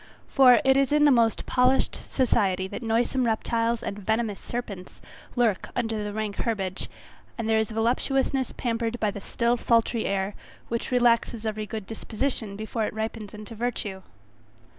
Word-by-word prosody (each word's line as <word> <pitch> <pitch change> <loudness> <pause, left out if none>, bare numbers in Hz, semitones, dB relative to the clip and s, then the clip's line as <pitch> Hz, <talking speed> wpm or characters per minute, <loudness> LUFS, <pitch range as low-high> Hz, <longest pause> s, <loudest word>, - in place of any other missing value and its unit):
For 255 -2 +6
it 265 0 +6
is 275 0 +2
in 300 0 +5
the 290 - +6
most 230 -3 +3
polished 255 +1 +2
society 195 -8 +2
that - - -6
noisome 235 +3 +1
reptiles 230 +1 0
and 200 - -4
venomous 220 0 -1
serpents 205 -7 -6 0.4
lurk 230 -6 +1
under 225 -3 -1
the 210 - -3
rank 210 -1 -3
herbage; 195 -5 -2 0.5
and 230 -2 -2
there 220 0 +3
is 220 - 0
voluptuousness 255 +4 0
pampered 230 -1 -1
by 210 -2 +1
the 200 - -7
still 235 +4 0
sultry 230 -1 +2
air, 195 +1 -1 0.4
which 235 0 -2
relaxes 235 -2 +2
every 215 -1 -2
good 215 -1 -5
disposition 220 0 -3
before 220 +1 -2
it - - -5
ripens 220 -1 -4
into 215 +2 -9
virtue. 215 -4 -3
225 Hz, 160 wpm, -26 LUFS, 210-240 Hz, 0.5 s, For